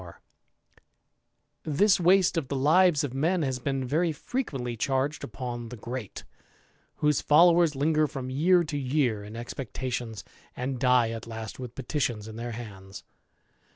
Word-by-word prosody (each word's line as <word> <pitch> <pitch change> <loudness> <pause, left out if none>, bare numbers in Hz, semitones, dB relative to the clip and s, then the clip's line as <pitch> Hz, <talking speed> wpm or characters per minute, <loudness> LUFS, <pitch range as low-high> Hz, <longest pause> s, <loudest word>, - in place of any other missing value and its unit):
284 85 -2 -22
THE - - -6
IDLER, 145 - -2
This 205 -3 +5
waste 180 +1 +4
of 160 -5 -1
the 140 - -3
lives 155 +3 +4
of 140 -3 -3
men 165 +6 +1
has 130 -2 -2
been 135 +1 -2
very 160 +6 +1
frequently 140 - -4
charged 135 +5 -1
upon 120 +1 -6
the 125 - -8
Great, 120 -1 -6 0.7
whose 150 -2 +1
followers 170 0 +5
linger 155 +2 +2
from 130 -2 -6
year 175 +6 +4
to 150 -2 -4
year 130 -6 0
in 105 +2 -9
expectations, 120 -2 -5 0.3
and 130 0 -3
die 125 -3 +3
at 115 0 -7
last 110 0 -7
with 125 -2 -7
petitions 120 -5 -2
in 110 - -9
their 120 +1 -5
hands. 100 -4 -9
130 Hz, 155 wpm, -27 LUFS, 120-155 Hz, 0.7 s, This